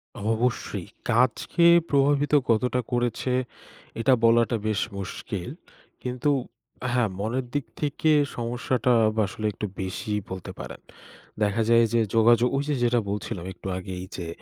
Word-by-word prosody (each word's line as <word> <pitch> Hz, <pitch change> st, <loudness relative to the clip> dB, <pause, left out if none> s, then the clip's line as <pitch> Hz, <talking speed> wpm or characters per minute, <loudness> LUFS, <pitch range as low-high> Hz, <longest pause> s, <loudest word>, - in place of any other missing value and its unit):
অ -, -, -8 dB, 0.2 s
অবশ্যই। 110 Hz, -5 st, -2 dB, 0.2 s
কাজকে 125 Hz, +8 st, +2 dB, 0.2 s
প্রভাবিত 145 Hz, +1 st, +2 dB, 0.2 s
কতটা 125 Hz, +2 st, +2 dB
করেছে 120 Hz, +1 st, 0 dB, 0.7 s
এটা 130 Hz, +3 st, +4 dB
বলাটা 115 Hz, 0 st, +4 dB
বেশ 105 Hz, -2 st, 0 dB, 0.2 s
মুশকিল। 100 Hz, 0 st, -5 dB, 0.5 s
কিন্তু 125 Hz, +3 st, -1 dB, 0.6 s
হ্যাঁ, 120 Hz, -3 st, +2 dB
মনের 120 Hz, +5 st, -1 dB
দিক 145 Hz, -3 st, -1 dB, 0.2 s
থেকে 150 Hz, +1 st, +1 dB, 0.2 s
সমস্যাটা 120 Hz, +1 st, 0 dB, 0.3 s
আসলে 110 Hz, +2 st, -6 dB
একটু 105 Hz, -, -4 dB
বেশিই 95 Hz, +3 st, -2 dB
বলতে 95 Hz, -1 st, -6 dB
পারেন। -, -, -8 dB, 0.6 s
দেখা 105 Hz, +2 st, +1 dB
যায় 115 Hz, 0 st, +6 dB
যে 115 Hz, -, +4 dB, 0.2 s
যোগাযোগ, 120 Hz, +2 st, +5 dB
ওই 140 Hz, -, 0 dB
যে 145 Hz, -, +1 dB
যেটা 120 Hz, 0 st, +3 dB
বলছিলাম 100 Hz, -2 st, -4 dB
একটু 95 Hz, -, -10 dB
আগেই 90 Hz, -1 st, -6 dB
যে 85 Hz, -, -5 dB
115 Hz, 135 wpm, -25 LUFS, 105-125 Hz, 0.7 s, যায়